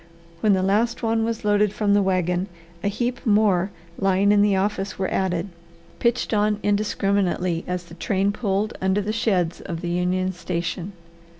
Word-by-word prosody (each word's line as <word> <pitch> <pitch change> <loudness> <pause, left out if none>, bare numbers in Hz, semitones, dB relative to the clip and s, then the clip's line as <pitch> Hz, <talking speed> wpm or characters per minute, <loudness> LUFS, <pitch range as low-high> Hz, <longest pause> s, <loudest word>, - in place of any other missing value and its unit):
When 210 +3 +3
the 185 -1 +1
last 220 +6 +1
one 225 0 +1
was 225 -1 -3
loaded 205 0 +3
from 210 -1 +1
the 205 - +4
wagon, 185 -1 0 0.4
a - - +1
heap 240 +5 -2
more 205 -5 +3 0.3
lying 195 +1 +3
in 205 0 +5
the 205 -1 +3
office 195 0 -1
were 190 - -1
added, 185 0 -1 0.5
pitched 235 -1 +1
on 210 0 +2
indiscriminately 200 -4 0
as 180 -1 -2
the 170 - -14
train 195 +3 0
pulled 205 -1 -1
under 190 +2 +2
the 210 +2 -2
sheds 190 -7 0
of 170 -3 -5
the 175 - -3
Union 180 +1 0
Station. 175 +2 -4
195 Hz, 170 wpm, -23 LUFS, 185-210 Hz, 0.5 s, in